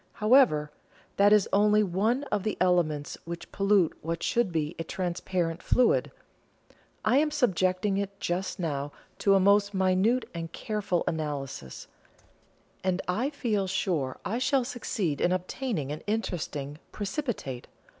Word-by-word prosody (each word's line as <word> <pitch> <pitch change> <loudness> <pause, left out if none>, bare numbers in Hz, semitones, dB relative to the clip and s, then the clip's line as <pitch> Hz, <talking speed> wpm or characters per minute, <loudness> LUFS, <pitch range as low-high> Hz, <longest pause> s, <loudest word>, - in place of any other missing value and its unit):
However, 215 - +4 0.5
that 200 +1 +5
is 210 -2 +5
only 210 +1 +4
one 210 +8 0
of 210 - +1
the 215 +1 -2
elements 170 -5 +1
which 170 0 -7
pollute 195 -4 +2
what 165 +1 -3
should 235 -6 +1
be 160 -1 -2
a - - -1
transparent 175 -1 -2
fluid. 250 - +3 1.0
I 230 +5 +4
am 305 +1 +2
subjecting 195 - +1
it 200 0 -4
just 180 +3 -2
now 145 -4 -2 0.3
to 200 -1 +4
a - - +5
most 200 +1 +3
minute 190 +6 +2
and 165 -1 -5
careful 200 -3 -2
analysis, 140 - -4 1.0
and 185 -1 0
I 220 +10 0
feel 220 -9 -1
sure 175 -8 -1
I 230 +4 -1
shall 265 +1 +2
succeed 220 - -2
in 175 - +3
obtaining 185 - -2
an 150 - -5
interesting 155 -9 -3
'precipitate.' 200 - -4
190 Hz, 135 wpm, -28 LUFS, 165-215 Hz, 1.0 s, that